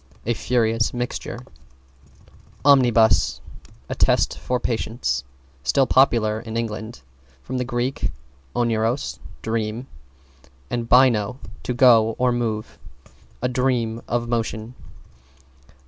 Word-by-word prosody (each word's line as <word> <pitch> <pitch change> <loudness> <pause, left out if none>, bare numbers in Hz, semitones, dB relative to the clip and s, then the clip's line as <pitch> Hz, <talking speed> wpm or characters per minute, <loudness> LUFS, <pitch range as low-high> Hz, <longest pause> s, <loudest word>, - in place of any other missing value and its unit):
A 120 - +1
furious 115 -1 0
mixture. 120 0 -4 1.3
=OMNIBUS= 120 -7 +4 0.5
A - - -3
test - - +2
for 125 0 -1
Patience, 110 - -2 0.4
still 135 - +2
popular 115 -5 +3
in 115 0 -6
England. 110 - -5 0.4
From 130 0 -4
Grk. 125 +1 -1 0.5
oneiros, 115 +2 0 0.2
dream, 110 +2 -2 0.9
and 120 -1 -2
baino, 125 -3 +4 0.2
to 125 - -3
go 115 -3 +5
or 125 0 +2
move. 115 -3 -3 0.6
A - - +3
dream 125 -3 0
of 120 0 -1
motion. 115 -1 -2
115 Hz, 100 wpm, -22 LUFS, 110-125 Hz, 1.3 s, go